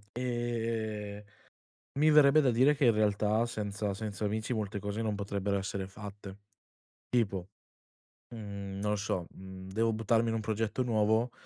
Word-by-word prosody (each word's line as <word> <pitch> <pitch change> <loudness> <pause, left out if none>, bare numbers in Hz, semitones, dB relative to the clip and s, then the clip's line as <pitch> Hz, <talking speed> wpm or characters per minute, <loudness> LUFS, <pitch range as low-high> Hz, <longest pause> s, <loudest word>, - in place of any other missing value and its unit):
Ehm, 115 -4 -2 0.8
mi 155 +1 +5
verrebbe 150 0 +7
da 130 - +3
dire 130 +6 +4
che 140 -2 +2
in 120 - +7
realtà 105 +1 +2
senza 105 -3 -3
senza 105 0 -4
amici 110 +4 -1
molte 105 -2 -2
cose 105 +2 -3
non 110 -2 -1
potrebbero 100 0 -1
essere 95 0 -3
fatte. 100 0 -9 0.7
Tipo, 100 -6 0 0.9
mhmm, 100 -3 -6
non 105 0 0
lo - - +1
so, 95 -4 -2
mhmm, 95 0 -10
devo 115 +3 +1
buttarmi 115 +1 +2
in - - -1
un - - -1
progetto 110 +3 -1
nuovo, 110 0 +2
105 Hz, 150 wpm, -31 LUFS, 100-115 Hz, 0.9 s, verrebbe